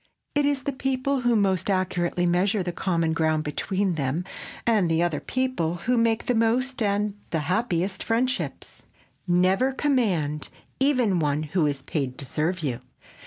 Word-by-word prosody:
It 290 Hz, -1 st, +2 dB
is 280 Hz, -2 st, 0 dB
the 280 Hz, -, -1 dB
people 265 Hz, 0 st, -1 dB
who 240 Hz, -1 st, +3 dB
most 190 Hz, -3 st, +1 dB
accurately 180 Hz, -2 st, 0 dB
measure 185 Hz, +3 st, +2 dB
the 175 Hz, -, -2 dB
common 170 Hz, -2 st, 0 dB
ground 155 Hz, -1 st, +1 dB
between 190 Hz, +5 st, -1 dB
them 150 Hz, +3 st, -1 dB, 0.4 s
and 210 Hz, -8 st, +3 dB
other 165 Hz, -2 st, +1 dB
people 255 Hz, -11 st, -1 dB
who 225 Hz, +9 st, 0 dB
make 230 Hz, -1 st, +2 dB
the 250 Hz, -, +1 dB
most 240 Hz, +3 st, +1 dB
and 205 Hz, 0 st, +1 dB, 0.2 s
the 160 Hz, -, -1 dB
happiest 185 Hz, +2 st, -1 dB
friendships. 250 Hz, +3 st, -2 dB, 0.5 s
Never 185 Hz, +8 st, +3 dB
command 200 Hz, -, 0 dB, 0.3 s
even 250 Hz, -9 st, +3 dB
one 150 Hz, -1 st, 0 dB
who 155 Hz, +1 st, +1 dB
is 140 Hz, -2 st, -2 dB
paid 135 Hz, -3 st, -3 dB
to 140 Hz, -, -4 dB
serve 160 Hz, +7 st, -1 dB
you. 125 Hz, -5 st, -1 dB
185 Hz, 155 wpm, -25 LUFS, 165-240 Hz, 0.5 s, who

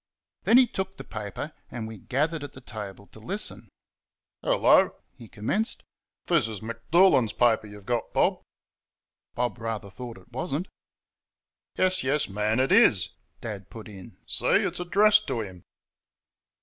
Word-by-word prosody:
Then 230 Hz, -, +7 dB
he 260 Hz, -, +8 dB
took 190 Hz, -4 st, -4 dB
the -, -, -7 dB
paper, 110 Hz, -, -6 dB, 0.2 s
and 115 Hz, -3 st, -5 dB
we 110 Hz, -2 st, -9 dB
gathered 150 Hz, -, -1 dB
at 145 Hz, -, -7 dB
the -, -, -10 dB
table 105 Hz, -5 st, -8 dB
to -, -, -12 dB
listen. -, -, -3 dB, 0.7 s
"Hello," -, -, +4 dB, 0.2 s
he 115 Hz, -, -12 dB
commenced, 195 Hz, -, -1 dB, 0.4 s
"this 160 Hz, -10 st, +3 dB
is 110 Hz, -3 st, -6 dB
M'Doolan's 115 Hz, -, +3 dB
paper 115 Hz, -2 st, +3 dB
you've 105 Hz, -1 st, -12 dB
got, 120 Hz, 0 st, -1 dB
Bob." -, -, +2 dB, 0.9 s
Bob 120 Hz, -4 st, -1 dB
rather 110 Hz, -3 st, -4 dB
thought 120 Hz, +1 st, -8 dB
it -, -, -18 dB
was 130 Hz, +3 st, -3 dB
n't. 175 Hz, +6 st, -2 dB, 1.1 s
"Yes, 185 Hz, 0 st, +2 dB
yes, 140 Hz, +2 st, +1 dB
man, 105 Hz, +3 st, 0 dB
it 130 Hz, +4 st, +2 dB
IS," 110 Hz, -, +5 dB, 0.3 s
Dad 100 Hz, -4 st, -6 dB
put 110 Hz, -2 st, -10 dB
in; 95 Hz, -4 st, -12 dB
"see, -, -, -2 dB
it's -, -, +2 dB
addressed 205 Hz, +4 st, +4 dB
to 115 Hz, -, -1 dB
him." 95 Hz, -4 st, -8 dB
115 Hz, 150 wpm, -27 LUFS, 105-155 Hz, 1.1 s, he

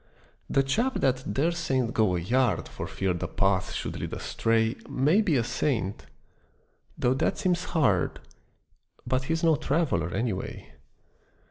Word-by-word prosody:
The 135 Hz, -, +3 dB
chap 230 Hz, -, 0 dB
that 130 Hz, 0 st, +1 dB
daresent 135 Hz, -6 st, 0 dB
go 105 Hz, -5 st, +2 dB
a -, -, 0 dB
yard 115 Hz, +1 st, +1 dB
For -, -, -6 dB
fear 95 Hz, -2 st, -1 dB
the 85 Hz, -, -3 dB
path 95 Hz, -2 st, +1 dB
should -, -, -4 dB
lead -, -, -4 dB
astray 115 Hz, 0 st, 0 dB
May 155 Hz, +11 st, +3 dB
be 175 Hz, -8 st, +1 dB
a 120 Hz, -, +2 dB
saint 115 Hz, -6 st, -2 dB, 0.9 s
though 125 Hz, -, +2 dB
that 130 Hz, -, 0 dB
seems 180 Hz, -1 st, 0 dB
hard, 110 Hz, -, +1 dB, 0.9 s
But 130 Hz, +1 st, 0 dB
he's 165 Hz, +3 st, -1 dB
no 165 Hz, -2 st, +5 dB
traveller, 135 Hz, -, 0 dB
any 115 Hz, +1 st, 0 dB
way. 95 Hz, -, -7 dB
130 Hz, 145 wpm, -27 LUFS, 105-155 Hz, 0.9 s, no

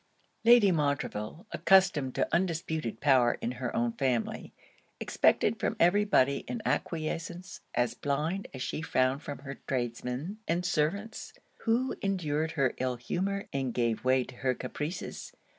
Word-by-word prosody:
Lady 230 Hz, -4 st, +7 dB
Montreville, 145 Hz, -, -2 dB
accustomed 180 Hz, -9 st, +3 dB
to -, -, +1 dB
undisputed 160 Hz, -9 st, -1 dB
power 130 Hz, -4 st, +4 dB
in 120 Hz, -, -2 dB
her 125 Hz, -1 st, -4 dB
own 120 Hz, 0 st, +1 dB
family, 125 Hz, -2 st, -1 dB, 0.5 s
expected -, -, +2 dB
from -, -, 0 dB
every 200 Hz, +5 st, +4 dB
body 140 Hz, -9 st, +3 dB
an 240 Hz, -, -3 dB
acquiescence 170 Hz, +3 st, -3 dB
as 120 Hz, -1 st, +1 dB
blind 155 Hz, +7 st, -2 dB
as 130 Hz, -1 st, -5 dB
she -, -, -3 dB
found 130 Hz, -2 st, +1 dB
from 145 Hz, -1 st, -6 dB
her 140 Hz, 0 st, -8 dB
tradesmen 125 Hz, -, -3 dB
and 175 Hz, +2 st, 0 dB
servants, 180 Hz, +7 st, -1 dB, 0.3 s
who 240 Hz, +3 st, +1 dB
endured 160 Hz, -5 st, -1 dB
her 135 Hz, -5 st, +1 dB
ill 130 Hz, -1 st, 0 dB
humour 195 Hz, -, -2 dB
and 135 Hz, -3 st, -2 dB
gave 115 Hz, -2 st, 0 dB
way 130 Hz, 0 st, +3 dB
to 125 Hz, -, -12 dB
her 130 Hz, -1 st, 0 dB
caprices. 150 Hz, -, -5 dB
150 Hz, 140 wpm, -30 LUFS, 130-180 Hz, 0.5 s, Lady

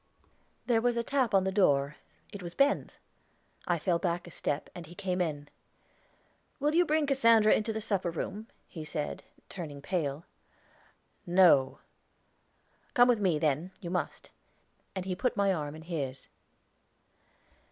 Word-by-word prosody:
There 230 Hz, -2 st, +2 dB
was 240 Hz, 0 st, +1 dB
a 235 Hz, -, +1 dB
tap 260 Hz, -1 st, +1 dB
on 195 Hz, -1 st, +4 dB
the 190 Hz, -, 0 dB
door; 145 Hz, -7 st, +2 dB, 0.4 s
it 200 Hz, -, -7 dB
was 175 Hz, -1 st, -7 dB
Ben's. 280 Hz, +1 st, +1 dB, 0.7 s
I 175 Hz, -, +2 dB
fell 170 Hz, +1 st, 0 dB
back 175 Hz, 0 st, -1 dB
a 175 Hz, -, -11 dB
step, 145 Hz, -1 st, -2 dB
and 170 Hz, -3 st, -9 dB
he 175 Hz, -, -12 dB
came 185 Hz, 0 st, -2 dB
in. 145 Hz, -4 st, -2 dB, 1.1 s
"Will 295 Hz, +2 st, +1 dB
you 350 Hz, +2 st, +4 dB
bring 310 Hz, 0 st, +2 dB
Cassandra 230 Hz, -6 st, +4 dB
to 220 Hz, -, -3 dB
the 220 Hz, -, -3 dB
supper 200 Hz, -5 st, -1 dB
room?" 190 Hz, +6 st, -5 dB, 0.2 s
he 160 Hz, -, -8 dB
said, 155 Hz, -1 st, -4 dB, 0.2 s
turning 155 Hz, -6 st, -7 dB
pale. 150 Hz, -1 st, -2 dB, 1.0 s
"No." 175 Hz, -7 st, +5 dB, 1.2 s
"Come 245 Hz, -2 st, +7 dB
with 240 Hz, -3 st, +3 dB
me, 185 Hz, -6 st, +2 dB
then; 155 Hz, +4 st, 0 dB
you 175 Hz, -, -6 dB
must." 180 Hz, -, -3 dB, 0.6 s
And 185 Hz, -1 st, -3 dB
he 190 Hz, -, -2 dB
put 245 Hz, +7 st, -1 dB
my 200 Hz, -1 st, +3 dB
arm 150 Hz, -3 st, -4 dB
in 160 Hz, -, -10 dB
his. 140 Hz, -6 st, -5 dB
180 Hz, 150 wpm, -30 LUFS, 155-220 Hz, 1.2 s, Come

